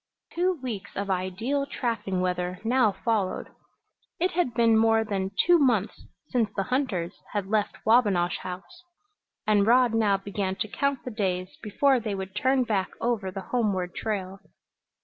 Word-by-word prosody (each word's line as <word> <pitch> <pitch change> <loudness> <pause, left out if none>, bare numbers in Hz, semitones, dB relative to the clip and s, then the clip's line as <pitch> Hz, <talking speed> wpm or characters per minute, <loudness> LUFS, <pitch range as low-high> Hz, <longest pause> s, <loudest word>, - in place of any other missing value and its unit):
Two 360 +2 +1
weeks 210 -6 -4
of 200 0 -2
ideal 200 +10 -1
trapping 225 -9 -2
weather 180 0 -1
now 235 -2 +3
followed. 210 -3 -1 0.7
It 360 +2 +1
had 325 -9 0
been 230 -1 +4
more 225 0 +4
than 195 -3 -2 0.2
two 350 0 +6
months 235 -8 +1 0.2
since 235 -4 +1
the 195 - 0
hunters 195 -10 -1 0.2
had 205 -2 -1
left 210 +1 0
Wabinosh 205 -7 +3
House, 190 - -8 0.6
and 210 -1 +3
Rod 245 0 +5
now 210 -3 +3
began 195 -1 -3
to 215 - -3
count 280 +4 -1
the 250 - -4
days 185 -4 -2
before 260 +5 +2
they 215 -3 -3
would 190 0 -6
turn 260 +3 +2
back 205 -5 0
over 230 -5 -1
the 190 0 -8
homeward 195 -7 0
trail. 195 -3 -3
215 Hz, 155 wpm, -26 LUFS, 190-245 Hz, 0.7 s, two